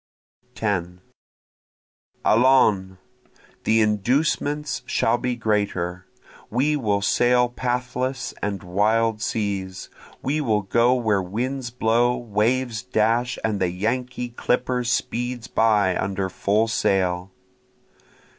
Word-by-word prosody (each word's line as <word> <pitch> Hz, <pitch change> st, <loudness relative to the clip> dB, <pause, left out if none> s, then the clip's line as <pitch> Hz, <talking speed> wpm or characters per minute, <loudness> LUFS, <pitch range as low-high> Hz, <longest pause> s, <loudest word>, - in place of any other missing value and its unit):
10 90 Hz, -4 st, -2 dB, 1.3 s
Allons! 110 Hz, -6 st, +4 dB, 0.7 s
the 110 Hz, +1 st, +4 dB
inducements 140 Hz, +7 st, 0 dB
shall 115 Hz, +2 st, +1 dB
be 125 Hz, -1 st, -1 dB
greater, 95 Hz, -5 st, -1 dB, 0.4 s
We 140 Hz, +7 st, +1 dB
will 105 Hz, -7 st, 0 dB
sail 125 Hz, +3 st, +3 dB
pathless 125 Hz, +1 st, -2 dB
and 100 Hz, -1 st, -3 dB
wild 110 Hz, +4 st, +1 dB
seas, 100 Hz, -5 st, -3 dB, 0.3 s
We 150 Hz, +4 st, 0 dB
will 110 Hz, -6 st, +1 dB
go 120 Hz, +5 st, +3 dB
where 110 Hz, -5 st, +1 dB
winds 120 Hz, +7 st, -3 dB
blow, 120 Hz, +1 st, +1 dB
waves 115 Hz, +1 st, 0 dB
dash, 120 Hz, 0 st, 0 dB
and 105 Hz, -2 st, 0 dB
the 90 Hz, -, +2 dB
Yankee 125 Hz, +6 st, -2 dB
clipper 125 Hz, +1 st, -1 dB
speeds 120 Hz, 0 st, -2 dB
by 105 Hz, -5 st, +2 dB
under 95 Hz, 0 st, -2 dB
full 105 Hz, +4 st, +1 dB
sail. 95 Hz, -4 st, 0 dB
115 Hz, 100 wpm, -23 LUFS, 100-125 Hz, 1.3 s, Allons